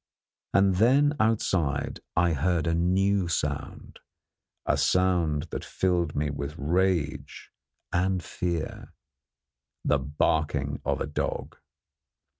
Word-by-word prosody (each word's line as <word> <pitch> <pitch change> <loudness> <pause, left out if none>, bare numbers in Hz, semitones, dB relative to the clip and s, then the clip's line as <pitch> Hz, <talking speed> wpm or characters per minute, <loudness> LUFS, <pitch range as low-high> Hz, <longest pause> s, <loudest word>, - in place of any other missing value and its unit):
And 95 -1 +4
then 140 +7 +4
outside 95 -10 0 0.2
I 85 0 +3
heard 80 +3 +1
a 85 - +1
new 95 +3 +2
sound, 85 - -3 0.7
a - - +2
sound 85 -5 +2
that - - -4
filled 90 -4 0
me 75 0 0
with 70 +1 -5
rage 85 -1 -1 0.4
and 90 0 +1
fear 85 -2 -4 0.9
the 75 - +3
barking 75 0 0
of - - -1
a - - 0
dog. 75 - -3
85 Hz, 105 wpm, -27 LUFS, 75-95 Hz, 0.9 s, And